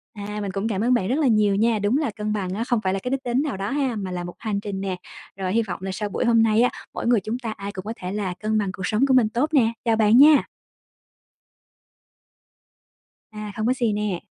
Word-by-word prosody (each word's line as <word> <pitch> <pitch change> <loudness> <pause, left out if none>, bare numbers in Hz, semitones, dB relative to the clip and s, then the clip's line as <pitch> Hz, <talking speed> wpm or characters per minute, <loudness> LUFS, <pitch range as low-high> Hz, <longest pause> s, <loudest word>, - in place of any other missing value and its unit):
À, 210 0 -5
mình 200 -2 -3
cũng 195 +3 -2
cảm 210 -3 -1
ơn 245 +2 +3
bạn 195 -6 +1
rất 265 +6 0
là 295 - +3
nhiều 215 -4 +3
nha. 220 +1 +2
Đúng 205 +7 +1
là 295 -8 -1
cân 215 -1 -2
bằng 185 -3 -2
á 215 +4 -2
không 240 -2 0
phải 190 -1 0
là 195 - -1
cái 250 - -3
đích 270 0 -1
đến 245 +2 +1
nào 285 -10 -3
đó 195 +1 -3
ha, 270 -4 0
mà 190 -3 -4
là 175 -1 -4
một 175 - -8
hành 210 -3 -2
trình 200 -2 -5
nè. 190 -2 -2 0.4
Rồi, 185 -1 -2
hy 230 - +3
vọng 205 -5 -5
là 195 - -3
sau 210 +1 -3
buổi 220 - -2
hôm 230 -1 +4
nay 220 +1 +3
á, 245 - +4 0.2
mỗi - - -4
người 240 -3 +4
chúng 225 +6 -4
ta 235 -3 -4
ai 200 -1 -6
cũng 190 0 -8
có 220 - -3
thể 180 0 -6
là 200 -3 -2
cân 215 0 0
bằng 200 -3 0
cuộc 180 -1 -4
sống 220 +5 +2
của 265 - +3
mình 245 -4 +4
tốt 250 +7 0
nè. 235 -6 +4
Chào 225 -1 +3
bạn 220 +1 +4
nha! 295 +2 +7 2.9
À, 210 -1 -7
không 215 - -2
có 255 - +3
gì 235 -4 0
nè. 205 -3 -2
215 Hz, 265 wpm, -23 LUFS, 200-240 Hz, 2.9 s, nha